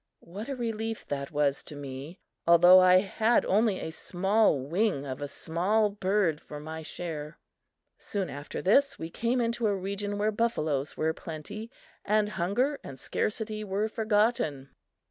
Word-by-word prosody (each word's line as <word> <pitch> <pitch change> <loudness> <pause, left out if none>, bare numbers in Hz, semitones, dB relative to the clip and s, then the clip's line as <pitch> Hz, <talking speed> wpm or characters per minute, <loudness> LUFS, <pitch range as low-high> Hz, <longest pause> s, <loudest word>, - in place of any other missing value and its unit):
What 205 +8 -7
a 275 - -2
relief 225 -2 -3
that 140 -1 -3
was 145 -3 +1
to 150 - -8
me 140 +4 -7 0.3
although 175 +2 +8
I 185 0 +6
had 220 +4 +2
only 205 0 +2
a 160 - -5
small 190 0 +2
wing 165 +2 0
of 130 0 -5
a 145 - -2
small 190 +9 0
bird 195 -5 0
for 150 - -9
my 160 +2 -7
share! 155 -1 -5 0.6
Soon 200 -3 -3
after 145 -1 -6
this, 275 +9 +4
we 165 +1 -6
came 235 +6 0
into 235 -1 0
a 205 - +1
region 200 +2 -3
where 210 +1 +1
buffaloes 155 - -1
were 160 +1 +1
plenty, 185 +9 -7 0.3
and 210 0 +2
hunger 225 +10 0
and 135 - -9
scarcity 215 - -2
were 205 +1 -1
forgotten. 210 - 0
190 Hz, 155 wpm, -28 LUFS, 155-215 Hz, 0.6 s, although